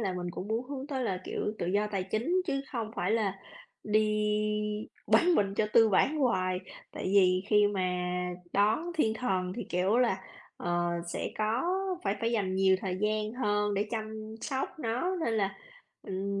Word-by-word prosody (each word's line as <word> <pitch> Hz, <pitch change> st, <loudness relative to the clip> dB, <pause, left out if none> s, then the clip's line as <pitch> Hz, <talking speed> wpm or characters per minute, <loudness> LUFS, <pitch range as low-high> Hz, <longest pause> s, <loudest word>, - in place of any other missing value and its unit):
là 195 Hz, -4 st, 0 dB
mình 175 Hz, -1 st, -3 dB
cũng 185 Hz, +4 st, -6 dB
muốn 230 Hz, +3 st, -1 dB
hướng 275 Hz, -1 st, -5 dB
tới 265 Hz, -4 st, -2 dB
là 185 Hz, -4 st, -1 dB
kiểu 210 Hz, -, -2 dB
tự 175 Hz, -, -2 dB
do 205 Hz, +3 st, +2 dB
tài 190 Hz, -2 st, 0 dB
chính 240 Hz, -, +1 dB
chứ 275 Hz, -3 st, 0 dB
không 225 Hz, -3 st, -2 dB
phải 185 Hz, -, 0 dB
là 200 Hz, -4 st, 0 dB, 0.5 s
đi 210 Hz, 0 st, +1 dB, 0.2 s
bán 350 Hz, 0 st, +5 dB
mình 195 Hz, -1 st, +2 dB
cho 210 Hz, -, +1 dB
tư 225 Hz, -1 st, +7 dB
bản 270 Hz, +9 st, +3 dB
hoài, 185 Hz, -10 st, +1 dB, 0.3 s
tại -, -, -6 dB
vì 185 Hz, -1 st, +4 dB
khi 210 Hz, -1 st, +5 dB
mà 185 Hz, -3 st, -1 dB, 0.5 s
đón 220 Hz, +13 st, +2 dB
thiên 220 Hz, -9 st, +2 dB
thần 185 Hz, -6 st, -1 dB
thì, 235 Hz, -, -3 dB
kiểu 185 Hz, +5 st, +2 dB
là, 235 Hz, -6 st, +2 dB, 0.4 s
ờ, 175 Hz, 0 st, 0 dB, 0.2 s
sẽ -, -, -3 dB
có 220 Hz, +5 st, +1 dB, 0.4 s
phải 200 Hz, -, +1 dB
phải 230 Hz, +1 st, 0 dB
dành 195 Hz, -5 st, 0 dB
nhiều 190 Hz, 0 st, +4 dB
thời 185 Hz, -2 st, -2 dB
gian 215 Hz, 0 st, 0 dB
hơn 210 Hz, -4 st, 0 dB
để 205 Hz, +2 st, 0 dB
chăm 220 Hz, -1 st, -5 dB
sóc 270 Hz, +2 st, -3 dB
nó, 255 Hz, +10 st, -1 dB
nên 225 Hz, -, 0 dB
là, 195 Hz, -2 st, 0 dB, 0.5 s
ừm, 195 Hz, +1 st, -3 dB
210 Hz, 185 wpm, -30 LUFS, 190-230 Hz, 0.5 s, tư